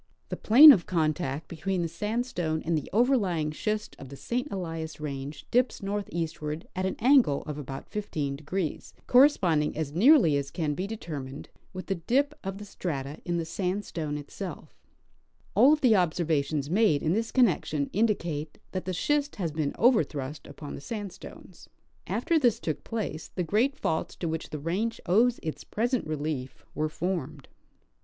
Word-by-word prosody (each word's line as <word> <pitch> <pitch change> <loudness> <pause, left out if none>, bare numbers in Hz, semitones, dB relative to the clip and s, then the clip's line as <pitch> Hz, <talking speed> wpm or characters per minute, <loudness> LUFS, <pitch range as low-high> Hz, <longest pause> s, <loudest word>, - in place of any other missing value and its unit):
The - - -2
plane 285 +8 +9
of 190 -11 +3
contact 155 -3 -1
between 175 +2 -2
the - - 0
sandstone 175 -3 -2
and 165 0 +1
the 155 - -3
overlying 200 - +2
schist 215 +5 -3
of 135 - -10
the 140 - -9
St. 245 - -3
Elias 165 -5 -5
range 140 -1 -6
dips 250 -3 +1
northeastward 165 -6 -3
at 185 +1 0
an 190 - -3
angle 245 - +4
of 150 -1 -6
about 135 -1 -7
15°, 155 -3 -3
corresponding, 185 - +4
as 155 -3 -2
nearly 195 - +6
as 140 -1 -3
can 155 -4 -2
be 185 +6 -3
determined, 145 -10 -7 0.2
with 185 0 -7
the 195 - -1
dip 265 - +1
of 195 0 -4
the 205 - -8
strata 145 -7 -5
in 175 0 -1
the 165 - -2
sandstone 170 -3 -3
itself 165 +6 -8 0.8
All 275 - +6
of 305 -1 +2
the 250 - +5
observa 165 -5 +2
tions 145 -1 -2
made 185 -3 +3
in 160 - +2
this 225 +2 -1
connection 170 - +2
indicate 170 -8 -1
that 185 - -4
the 185 - -2
schist 290 +9 0
has 175 -6 -2
been 150 -2 -1
overthrust 155 - +1
upon 145 - -8
the - - -7
sandstones. 205 +2 -8 0.4
After 335 -2 +1
this 240 -6 +2
took 155 -3 -3
place 210 -8 -4
the 180 - 0
great 230 - +1
faults 160 - -2
to 170 - -4
which 160 0 -3
the 150 - -5
range 185 +10 -2
owes 230 +7 +3
its 155 - -4
present 240 -2 -1
relief 150 -4 -4
were 155 0 -1
formed. 155 -5 -4
170 Hz, 165 wpm, -28 LUFS, 150-215 Hz, 0.8 s, plane